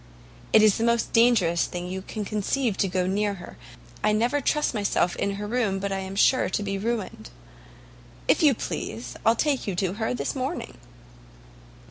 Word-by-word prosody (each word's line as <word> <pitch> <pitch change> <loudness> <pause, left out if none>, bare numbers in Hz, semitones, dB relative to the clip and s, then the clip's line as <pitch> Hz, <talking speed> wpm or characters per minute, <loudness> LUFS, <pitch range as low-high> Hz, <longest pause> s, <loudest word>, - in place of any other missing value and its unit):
It 215 - +6
is 215 -2 +5
the - - 0
most 235 0 +1
dangerous 215 -8 +4
thing 175 0 -5
you 185 +1 -5
can 210 +2 -6
conceive 215 +3 -1
to 195 - +2
go 185 0 0
near 200 +2 0
her; 175 -2 -11 0.5
I 210 - +3
never 240 +7 +1
trust 300 +2 +1
myself 200 -4 0
in 200 0 -1
her 205 +1 -5
room 215 -3 0
but 200 +1 -3
I 195 - -1
am 190 0 -6
sure 255 +4 +3
to 205 - -1
be 195 -1 -3
ruined. 215 - -3 1.0
If - - +3
you - - +5
please, 120 +2 -5
I'll 225 - +4
take 280 -1 0
you 195 - -2
to 185 0 -1
her 225 +2 -1
this - - -2
morning." 260 -1 -4
205 Hz, 185 wpm, -25 LUFS, 190-235 Hz, 1.0 s, It